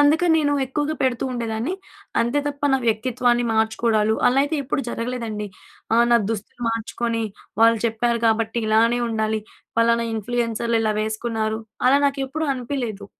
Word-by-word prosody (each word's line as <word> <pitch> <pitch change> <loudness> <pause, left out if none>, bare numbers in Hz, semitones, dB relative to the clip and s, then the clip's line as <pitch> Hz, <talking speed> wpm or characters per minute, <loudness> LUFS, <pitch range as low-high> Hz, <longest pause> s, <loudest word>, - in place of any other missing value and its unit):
అందుకని 320 +3 +4
నేను 290 -2 +1
ఎక్కువగా 295 +3 -2
పెడుతూ 255 -2 +1
ఉండేదాన్ని, 235 +7 -2 0.5
అంతే 240 +5 +1
తప్ప, 285 0 -4
నా 270 - +4
వ్యక్తిత్వాన్ని 240 +2 +1
మార్చుకోవడాలు 220 0 +2
అలా 250 +2 +2
అయితే 300 +2 -1
ఎప్పుడు 265 +1 -1
జరగలేదండి. 230 -3 -4 0.5
ఆ - - +5
నా 235 - +6
దుస్తులు 220 +2 -6
మార్చుకొని, 230 0 -2 0.4
వాళ్ళు 230 0 +6
చెప్పారు 235 +1 0
కాబట్టి 225 +1 +1
ఇలానే 230 +2 +3
ఉండాలి 220 -1 -1 0.4
పలానా 230 0 +3
ఇన్‌ప్లు‌యెన్సర్‌లు 230 +1 -1
ఇలా 215 -1 +1
వేసుకున్నారు. 220 0 -2 0.3
అలా 275 +2 +5
నాకు 275 0 -1
ఎప్పుడు 315 +3 -2
అనిపియలేదు. 245 -5 -4
235 Hz, 140 wpm, -22 LUFS, 220-255 Hz, 0.5 s, నా